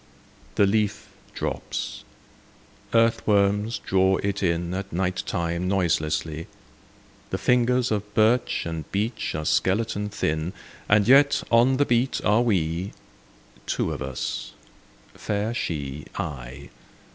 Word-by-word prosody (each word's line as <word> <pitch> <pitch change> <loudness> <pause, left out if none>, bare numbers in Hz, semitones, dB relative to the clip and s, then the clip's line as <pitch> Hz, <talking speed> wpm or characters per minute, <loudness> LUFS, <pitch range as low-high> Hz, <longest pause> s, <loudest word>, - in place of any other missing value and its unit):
The 100 - +5
leaf 105 0 0 0.3
drops: - - -4 0.9
earthworms 105 -1 +2
draw 95 0 +2
it 100 0 -1
in 85 -1 0
At 100 +1 -4
night 90 +1 -1
time 85 +1 -1
noiselessly, 80 -4 0 0.8
The - - -2
fingers 125 0 +2
of 105 -1 -2
birch 110 +3 +2
and 80 -3 -5
beech 110 +3 -2
are 75 0 -3
skeleton 105 +4 +1
thin, 80 -2 -2 0.4
And 105 0 +4
yet 140 +3 +5
on 120 +3 +5
the 145 - +3
beat 120 +1 +1
are 105 +3 +4
we,— 90 -5 0 0.7
Two - - -1
of - - -6
us; 65 0 -4 0.6
fair 105 +2 -2
She, 75 - -4
I. 70 -1 -6
100 Hz, 115 wpm, -25 LUFS, 85-110 Hz, 0.9 s, The